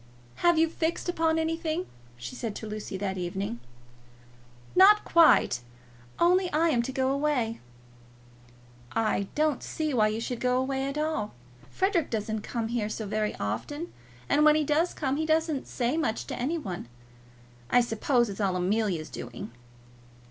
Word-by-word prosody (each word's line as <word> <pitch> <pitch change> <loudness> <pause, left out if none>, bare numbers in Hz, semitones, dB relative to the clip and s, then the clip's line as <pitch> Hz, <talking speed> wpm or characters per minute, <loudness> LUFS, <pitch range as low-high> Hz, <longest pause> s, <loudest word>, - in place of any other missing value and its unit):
"Have 345 -1 +3
you 325 +1 +4
fixed 325 +2 -2
upon 325 -2 +1
anything?" 325 +1 -1 0.3
she 120 +1 -7
said 225 -4 -4
to - - -6
Lucy 210 -2 -5
that 190 -1 -3
evening. 180 -7 -3 1.2
"Not 415 +3 +7
quite; 325 - +5 0.6
only 360 +1 +3
I 325 +3 +3
am 245 -6 +2
to 240 - -4
go 265 0 +1
away." 275 -5 0 1.3
"I 215 -3 0
don't 300 -3 +1
see 310 -2 -3
why 215 -4 +4
you 215 +1 -2
should 235 +1 -4
go 250 0 +1
away 265 +1 -1
at 275 +2 -4
all. 305 - -2 0.3
Frederic 380 -5 +1
doesn't 220 -1 -2
come 225 0 -3
here 230 -3 -1
so 220 0 -4
very 215 +1 -1
often, 290 - -4 0.3
and 300 - +3
when 305 0 +7
he 310 - +2
does 310 +4 +1
come 275 -2 -1
he 315 - 0
doesn't 315 -3 +1
say 250 +4 -1
much 230 -9 -1
to - - -5
any 290 +8 -1
one. 185 - -6 0.8
I - - +5
suppose 240 +2 +1
it's 200 0 -5
all 190 -2 +1
Amelia's 180 -4 0
doing." 120 -1 -7
260 Hz, 160 wpm, -28 LUFS, 215-315 Hz, 1.3 s, Not